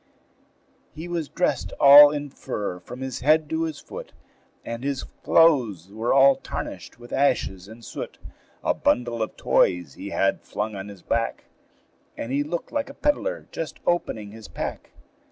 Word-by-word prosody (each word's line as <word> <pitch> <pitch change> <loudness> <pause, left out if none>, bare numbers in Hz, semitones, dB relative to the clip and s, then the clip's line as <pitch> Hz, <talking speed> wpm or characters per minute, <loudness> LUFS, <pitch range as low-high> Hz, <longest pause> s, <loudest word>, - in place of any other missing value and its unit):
He 160 +3 -7
was 170 -4 -3
dressed 180 - -1
all 145 +1 +10
in 145 -1 -4
fur 100 -7 -4
from 125 +8 -10
his 130 -2 -4
head 155 +3 +3
to 160 +1 0
his 160 -2 -5
foot, - - -10 0.5
And 115 +1 -5
his 140 -1 -2
clothes 115 - +2
were 110 +3 -1
all 135 0 +6
tarnished - - -7
with 120 0 -12
ashes 110 -9 +1
and 115 +2 -12
soot; - - -7 0.5
A - - +2
bundle 120 -1 0
of 110 - -3
toys 90 -6 +2
he - - -8
had - - +1
flung 105 0 -4
on 95 0 -6
his 100 -3 -12
back, 115 0 -1 0.7
And 115 - -5
he 140 +2 +1
looked 165 +4 -4
like 290 -2 -2
a 275 - -11
pedler - - -1
just - - -5
opening 110 -12 -1
his 110 -1 -11
pack. - - -5
130 Hz, 165 wpm, -24 LUFS, 110-155 Hz, 0.7 s, all